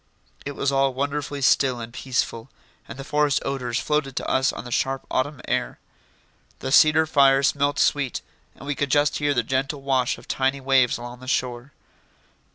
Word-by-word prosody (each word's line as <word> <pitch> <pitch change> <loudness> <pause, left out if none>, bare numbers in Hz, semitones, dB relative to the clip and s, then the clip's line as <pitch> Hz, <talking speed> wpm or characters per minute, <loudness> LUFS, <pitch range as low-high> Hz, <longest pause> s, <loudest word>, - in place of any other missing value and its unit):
It 145 - -4
was 140 0 -1
all 135 -1 +1
wonderfully 145 +1 -3
still 130 -2 +3
and 115 0 -8
peaceful, 125 -2 -3 0.4
and - - -9
the 135 - -7
forest 150 -1 +1
odours 125 -3 -2
floated 150 -2 -1
to - - -3
us 130 0 +2
on - - -7
the 120 - -8
sharp 135 +2 -1
autumn 130 +1 -1
air. - - -1 0.8
The 130 - -5
cedar 155 +2 +6
fire 140 -3 +4
smelt 140 +1 +1
sweet 140 -4 0 0.3
and - - -12
we 145 - -1
could 140 0 -2
just 145 +1 +2
hear 145 -1 +1
the 120 - +1
gentle 135 +4 -2
wash 130 -2 +1
of - - -16
tiny 135 +1 0
waves 130 -2 +2
along 120 +1 -9
the 130 - -12
shore. 125 0 -2
135 Hz, 180 wpm, -23 LUFS, 130-145 Hz, 0.8 s, cedar